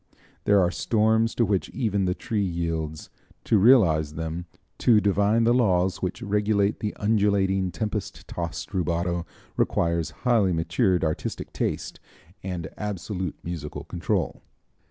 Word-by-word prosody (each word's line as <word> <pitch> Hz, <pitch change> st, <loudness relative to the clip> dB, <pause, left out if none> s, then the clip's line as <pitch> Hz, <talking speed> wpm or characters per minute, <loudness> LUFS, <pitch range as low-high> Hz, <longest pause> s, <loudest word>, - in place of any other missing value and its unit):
There 100 Hz, -1 st, +5 dB
are 90 Hz, -2 st, +3 dB
storms 110 Hz, +3 st, +2 dB
to 115 Hz, -, +3 dB
which 100 Hz, -2 st, 0 dB
even 100 Hz, -6 st, 0 dB
the 90 Hz, 0 st, 0 dB
tree 110 Hz, -2 st, -2 dB
yields. 85 Hz, -4 st, -3 dB, 0.3 s
To 110 Hz, -, +3 dB
realize 85 Hz, -, +5 dB
them, 80 Hz, +2 st, -4 dB, 0.3 s
to 115 Hz, -4 st, +5 dB
divine 105 Hz, +2 st, +2 dB
the 115 Hz, +1 st, +4 dB
laws 95 Hz, -6 st, +2 dB
which 95 Hz, +6 st, -3 dB
regulate 105 Hz, -1 st, +1 dB
the 105 Hz, -, -3 dB
undulating, 100 Hz, -3 st, +2 dB
tempest 105 Hz, -1 st, -4 dB
tossed 85 Hz, +3 st, -5 dB
rubato, 85 Hz, -1 st, -1 dB, 0.3 s
requires 85 Hz, -2 st, +1 dB, 0.2 s
highly 110 Hz, -7 st, +3 dB
matured 90 Hz, +3 st, +1 dB
artistic 80 Hz, -1 st, -3 dB
taste -, -, -3 dB, 0.4 s
and 90 Hz, -4 st, -4 dB
absolute 95 Hz, -3 st, -4 dB
musical 80 Hz, -4 st, -5 dB
control. -, -, -2 dB
95 Hz, 130 wpm, -25 LUFS, 85-105 Hz, 0.4 s, There